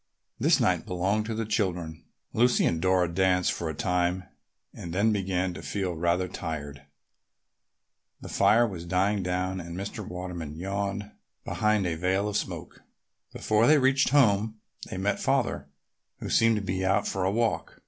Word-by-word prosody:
This -, -, +4 dB
night -, -, +1 dB
belonged 100 Hz, +4 st, 0 dB
to 115 Hz, -, -3 dB
the 115 Hz, 0 st, -2 dB
children. 90 Hz, -7 st, -2 dB, 0.3 s
Lucy 120 Hz, +2 st, +3 dB
and 80 Hz, -, 0 dB
Dora 95 Hz, -1 st, +3 dB
danced 90 Hz, +1 st, +2 dB
for 85 Hz, -, -3 dB
a 80 Hz, -, -4 dB
time 90 Hz, +2 st, 0 dB, 0.5 s
and 85 Hz, -, -7 dB
then 105 Hz, +4 st, +3 dB
began 95 Hz, -3 st, -1 dB
to -, -, -8 dB
feel 95 Hz, -3 st, -2 dB
rather 85 Hz, +2 st, 0 dB
tired. 75 Hz, -5 st, -6 dB, 1.4 s
The -, -, -9 dB
fire 120 Hz, +2 st, +4 dB
was 95 Hz, -7 st, -5 dB
dying 95 Hz, +4 st, +1 dB
down 90 Hz, +1 st, -2 dB
and 85 Hz, +1 st, -8 dB
Mr. 100 Hz, +3 st, -5 dB
Waterman 90 Hz, -4 st, -6 dB
yawned 100 Hz, +3 st, -3 dB, 0.3 s
behind 105 Hz, -2 st, +1 dB
a 85 Hz, -, 0 dB
veil 95 Hz, +4 st, 0 dB
of 105 Hz, -, -3 dB
smoke. -, -, -4 dB, 0.5 s
Before 110 Hz, +2 st, +2 dB
they 155 Hz, -, +6 dB
reached 135 Hz, 0 st, +3 dB
home 110 Hz, -5 st, +3 dB, 0.3 s
they -, -, -5 dB
met 100 Hz, +2 st, 0 dB
Father, -, -, 0 dB, 0.5 s
who -, -, -6 dB
seemed 115 Hz, 0 st, +4 dB
to 105 Hz, -, -2 dB
be 95 Hz, 0 st, -2 dB
out 95 Hz, +2 st, +2 dB
for 95 Hz, -, -2 dB
a 95 Hz, -, +2 dB
walk. 115 Hz, +3 st, -1 dB
95 Hz, 165 wpm, -27 LUFS, 90-105 Hz, 1.4 s, they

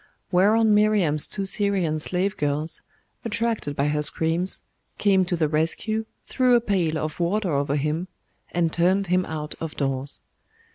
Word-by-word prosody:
Whereon 210 Hz, +4 st, +4 dB
Miriam's 210 Hz, -8 st, +3 dB
two 195 Hz, -2 st, -3 dB
Syrian 190 Hz, -6 st, +1 dB
slave 185 Hz, +5 st, -1 dB
girls, 150 Hz, +2 st, -2 dB, 0.4 s
attracted 230 Hz, -9 st, -2 dB
by 140 Hz, +1 st, +1 dB
her 150 Hz, 0 st, 0 dB
screams, 165 Hz, +4 st, 0 dB, 0.3 s
came 190 Hz, -2 st, +3 dB
to 175 Hz, -, -1 dB
the 160 Hz, -2 st, +1 dB
rescue, 190 Hz, +9 st, -1 dB, 0.2 s
threw 255 Hz, -2 st, +3 dB
a -, -, +6 dB
pail 185 Hz, -8 st, 0 dB
of 155 Hz, +1 st, -4 dB
water 185 Hz, +2 st, 0 dB
over 140 Hz, 0 st, 0 dB
him, 150 Hz, +5 st, -1 dB, 0.4 s
and 170 Hz, -2 st, 0 dB
turned 185 Hz, +3 st, +2 dB
him 185 Hz, 0 st, +2 dB
out 150 Hz, -1 st, -5 dB
of 165 Hz, -1 st, -5 dB
doors. 135 Hz, 0 st, -1 dB
175 Hz, 150 wpm, -24 LUFS, 155-200 Hz, 0.4 s, a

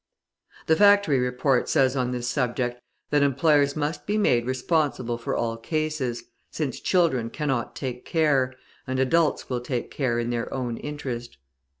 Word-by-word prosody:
The 160 Hz, -, +4 dB
Factory 200 Hz, -7 st, +5 dB
Report 125 Hz, +2 st, +1 dB
says 130 Hz, -1 st, +3 dB
on 125 Hz, -2 st, 0 dB
this 125 Hz, -1 st, -3 dB
subject, 125 Hz, -1 st, -1 dB, 0.3 s
that 145 Hz, -1 st, +3 dB
employers 140 Hz, +1 st, +3 dB
must 155 Hz, +1 st, -3 dB
be 210 Hz, +1 st, +1 dB
made 120 Hz, -, +2 dB
responsible 130 Hz, -3 st, 0 dB
for 115 Hz, -, -3 dB
all 115 Hz, -1 st, -1 dB
cases, 155 Hz, -2 st, -2 dB, 0.3 s
since 150 Hz, -4 st, -3 dB
children 160 Hz, -11 st, +1 dB
cannot 135 Hz, -4 st, -2 dB
take 125 Hz, -2 st, -5 dB
care, 145 Hz, -6 st, +2 dB, 0.4 s
and 130 Hz, 0 st, -2 dB
adults 150 Hz, +5 st, +2 dB
will 125 Hz, -2 st, -2 dB
take 125 Hz, -1 st, -3 dB
care 130 Hz, -5 st, 0 dB
in 120 Hz, 0 st, -1 dB
their 120 Hz, -1 st, -3 dB
own 120 Hz, -3 st, -3 dB
interest. 130 Hz, -, -6 dB
130 Hz, 155 wpm, -25 LUFS, 120-150 Hz, 0.4 s, Factory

